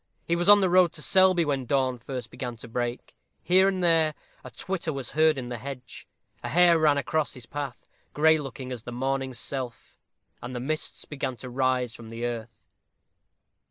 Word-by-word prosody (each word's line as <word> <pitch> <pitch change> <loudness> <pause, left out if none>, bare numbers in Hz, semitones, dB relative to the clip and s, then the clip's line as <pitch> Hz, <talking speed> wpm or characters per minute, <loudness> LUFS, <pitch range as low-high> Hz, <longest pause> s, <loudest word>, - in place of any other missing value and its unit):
He 170 - +1
was 175 +3 +1
on 205 0 +9
the 190 - +2
road 180 -2 +5
to 150 - -6
Selby 185 -3 +4
when 135 -4 -2
dawn 130 -2 +1
first 125 +1 -7
began 120 -2 -6
to 115 - -11
break. 120 +1 -4 0.3
Here 185 +2 +5
and 190 -2 -1
there 160 -3 +4 0.3
a - - -8
twitter 185 -4 -3
was 135 -4 -5
heard 155 -1 +3
in 125 -2 -5
the 120 -2 -5
hedge; 130 -1 -8 0.4
a 120 - -3
hare 170 +3 +5
ran 150 -2 +4
across 155 +2 -1
his 125 -3 -10
path, 140 -1 -6 0.2
gray 160 +1 +4
looking 135 -2 -7
as 125 -3 -5
the 120 - -8
morning 130 +1 -2
self; 125 0 -6 0.4
and 125 +1 -7
the - - -3
mists 155 +5 -3
began 135 -3 -4
to 125 0 -9
rise 130 -2 0
from 115 -1 -11
the 115 +1 -5
earth. 115 -2 -6
135 Hz, 195 wpm, -26 LUFS, 125-160 Hz, 0.4 s, on